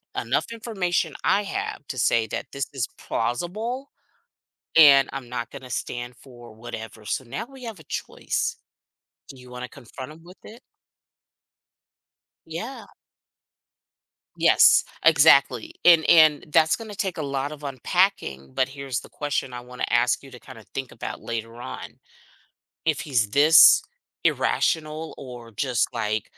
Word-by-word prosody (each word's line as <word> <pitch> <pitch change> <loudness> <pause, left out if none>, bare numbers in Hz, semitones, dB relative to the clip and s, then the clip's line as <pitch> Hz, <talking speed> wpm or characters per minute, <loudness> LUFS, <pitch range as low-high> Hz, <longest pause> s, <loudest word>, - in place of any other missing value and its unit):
enough - - -1
information 210 -6 -2
I 205 - +3
have 195 -6 -5
to 130 - -6
say 115 -2 +2
that - - -5
this 140 -2 -3
is 130 -5 -2
plausible 215 - -3 0.8
and 140 -4 +8
I'm 135 -3 -6
not 125 0 -5
gonna 130 -2 -10
stand 120 0 -5
for 120 -2 -14
whatever." 110 -1 -9
So 130 - -3
now 140 - -5
we 270 -1 -14
have 225 -4 -7
a 160 - -15
choice. - - -3 0.7
Do 135 - -11
you 125 0 -14
wanna 125 0 -7
confront 130 +3 -10
him 160 +2 -15
with 180 +2 -15
it? 230 +3 -12 1.9
Yeah. 215 +12 -7 1.5
Yes, - - +6 0.2
exactly, 330 +1 +5
and 165 -2 +7
and 155 -3 +6
that's 160 +1 +4
gonna 220 -2 -9
take 190 -3 -3
a - - -2
lot 140 0 -2
of 150 -1 -10
unpacking, 130 - -1
but 130 - +1
here's 135 -2 -4
the - - -14
question 145 -3 -3
I 120 - -6
wanna 125 +1 -5
ask 120 +1 +2
you 135 - -13
to 125 - -11
kinda 115 -5 -13
think 135 -2 -5
about - - -6
later 115 0 -5
on. - - -8 0.9
If 160 -2 +1
he's 120 -8 0
this 150 +6 +7 0.4
irrational 155 0 0
or 120 -3 -10
just 125 +2 0
like 110 -2 -1
135 Hz, 145 wpm, -24 LUFS, 120-165 Hz, 1.9 s, and